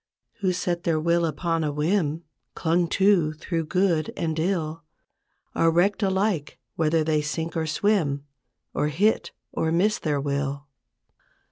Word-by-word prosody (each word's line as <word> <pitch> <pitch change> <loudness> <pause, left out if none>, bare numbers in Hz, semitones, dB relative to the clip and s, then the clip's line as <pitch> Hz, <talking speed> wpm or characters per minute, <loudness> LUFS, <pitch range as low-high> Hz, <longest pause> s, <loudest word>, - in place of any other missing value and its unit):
Who 190 -2 +1
set 175 -1 -2
their 165 -2 +1
will 170 +1 +2
upon 165 +1 -1
a 150 - 0
whim 155 +1 0 0.3
Clung 170 +1 +1
to 185 -4 +3
through 165 +1 -3
good 165 -1 +1
and 160 -1 -1
ill, 165 -2 -1 0.7
Are 165 - +3
wrecked 180 +6 +2
alike 190 -5 0 0.2
whether 160 0 +2
they 155 -1 +1
sink 160 +3 -3
or 160 -1 -1
swim, 155 -5 +1 0.5
Or 150 - 0
hit 195 +9 +1 0.2
or 160 - -1
miss 205 +7 +2
their 150 -3 0
will. 140 0 -2
165 Hz, 140 wpm, -25 LUFS, 155-180 Hz, 0.7 s, to